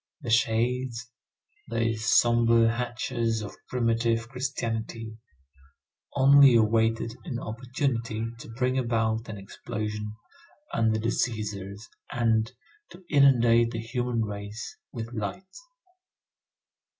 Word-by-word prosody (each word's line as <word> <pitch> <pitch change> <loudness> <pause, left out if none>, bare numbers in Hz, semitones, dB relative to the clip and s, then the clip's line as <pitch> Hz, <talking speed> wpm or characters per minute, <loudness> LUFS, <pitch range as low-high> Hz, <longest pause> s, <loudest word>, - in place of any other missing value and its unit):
The 120 -5 -4
shades, 115 +1 +1 0.6
those 115 -1 -1
sombre 115 -1 +4
hatchers 115 -2 -2
of 105 - -8
primitive 115 -2 +1
Christianity, 115 -3 -4 1.0
only 140 -1 +7
awaited 115 +1 +2
an 140 -9 -4
opportunity 115 -2 -2
to - - -10
bring 130 +3 0
about 115 -2 0
an 105 - -6
explosion 105 +2 -5 0.6
under 110 -1 +2
the 115 +1 -1
Cæsars 105 -4 -3 0.3
and 115 -1 +1 0.4
to 185 - -15
inundate 120 -5 +5
the 115 -1 -4
human 120 0 -1
race 105 +1 -6 0.2
with 115 0 -6
light. 125 - -5
115 Hz, 100 wpm, -27 LUFS, 110-120 Hz, 1.0 s, only